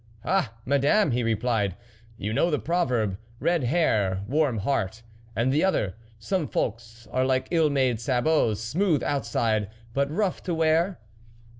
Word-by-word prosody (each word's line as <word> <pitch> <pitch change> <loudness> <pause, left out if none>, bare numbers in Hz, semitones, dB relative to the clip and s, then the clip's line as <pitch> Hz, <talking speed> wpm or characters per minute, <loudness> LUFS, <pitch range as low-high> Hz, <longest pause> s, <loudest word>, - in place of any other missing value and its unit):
" 110 - -24
Ah! 155 -13 0
Madame," 140 +7 +3
he 120 +1 +1
replied, 110 -4 0 0.4
"you 105 -1 -3
know 170 - +2
the 150 - +1
proverb: 125 - 0
' 115 0 -27
Red 170 -6 +1
hair, 105 - +1
warm 140 -2 +1
heart,' 110 -1 -1 0.3
and 120 +5 +1
the 150 - +2
other: 110 - +1
' 110 0 -28
Some 170 - -1
folks 115 +1 -4
are 130 - +1
like 130 0 0
ill 165 -3 +3
made 130 -5 +1
sabots, 125 -2 +1
smooth 155 - +1
outside, 115 -6 0 0.2
but 140 +2 +1
rough 185 +4 -1
to 175 - -1
wear 165 +4 +2
130 Hz, 160 wpm, -26 LUFS, 115-160 Hz, 0.4 s, Madame